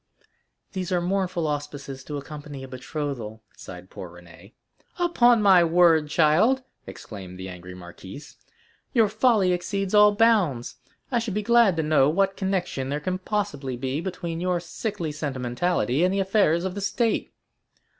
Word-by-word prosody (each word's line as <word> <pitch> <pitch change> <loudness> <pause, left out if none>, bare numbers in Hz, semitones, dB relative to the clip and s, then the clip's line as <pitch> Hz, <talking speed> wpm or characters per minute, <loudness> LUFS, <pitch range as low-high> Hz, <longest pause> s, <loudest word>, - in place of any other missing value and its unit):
"These 185 -2 -4
are 180 - +2
mournful 180 -1 -1
auspices 145 -2 -5
to 150 - -5
accompany 145 -1 -8
a - - -8
betrothal," 130 -4 -6
sighed 90 0 -11
poor 90 - -8
Renée. 85 +5 -16 0.4
"Upon 245 -11 +3
my 190 -3 +6
word, 165 -2 +4
child!" 175 - +3 0.2
exclaimed 95 -4 -9
the 95 0 -7
angry 90 0 -9
marquise, 90 - -11 0.6
"your 230 -5 +4
folly 215 -3 +2
exceeds 195 +2 -3
all 210 0 +6
bounds. 195 - +2 0.3
I 240 - +2
should 225 -4 -4
be 210 - -1
glad 235 -5 +4
to 160 - +1
know 150 -2 +3
what 195 +4 +1
connection 185 -9 -2
there 145 +1 -2
can 185 +4 -3
possibly 150 - -3
be 130 +4 -3
between 170 -2 -5
your 180 -1 0
sickly 175 -1 -4
sentimentality 140 +1 -1
and 185 - +3
the 195 - 0
affairs 190 -4 +2
of 190 - -3
the 200 - -5
state!" 225 +3 -1
170 Hz, 155 wpm, -25 LUFS, 135-195 Hz, 0.6 s, my